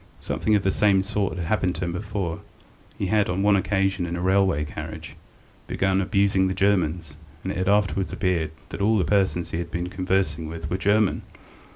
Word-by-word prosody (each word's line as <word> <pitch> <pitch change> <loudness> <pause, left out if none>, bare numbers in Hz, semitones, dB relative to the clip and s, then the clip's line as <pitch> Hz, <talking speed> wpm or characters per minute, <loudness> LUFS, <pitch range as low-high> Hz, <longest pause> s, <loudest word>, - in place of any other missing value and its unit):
Something 110 - 0
of 100 - +1
the 95 - +2
same 100 -1 +3
sort 100 -2 -2
had 85 - -3
happened 90 -1 0
to 90 +3 -3
him 85 - -2
before; 90 -2 -3 0.6
he - - -2
had, 105 +2 +2
on 90 +2 0
one 105 0 +5
occasion 95 -1 0
in 85 - -3
a - - -3
railway 95 -4 +2
carriage, 75 - -8 0.5
begun 95 0 +1
abusing 100 -1 +2
the 95 - -2
Germans, 85 -5 0 0.3
and - - -2
it - - -4
had 95 +1 0
afterwards 100 -2 +1
appeared 90 -5 0 0.2
that - - -6
all 110 +2 +3
the 90 - +1
persons 95 -1 +1
he 80 - -2
had 85 - -4
been 85 +1 -3
conversing 90 -4 -1
with 80 -1 -6
were 90 - +1
German. 105 +1 +2
95 Hz, 200 wpm, -24 LUFS, 85-100 Hz, 0.6 s, one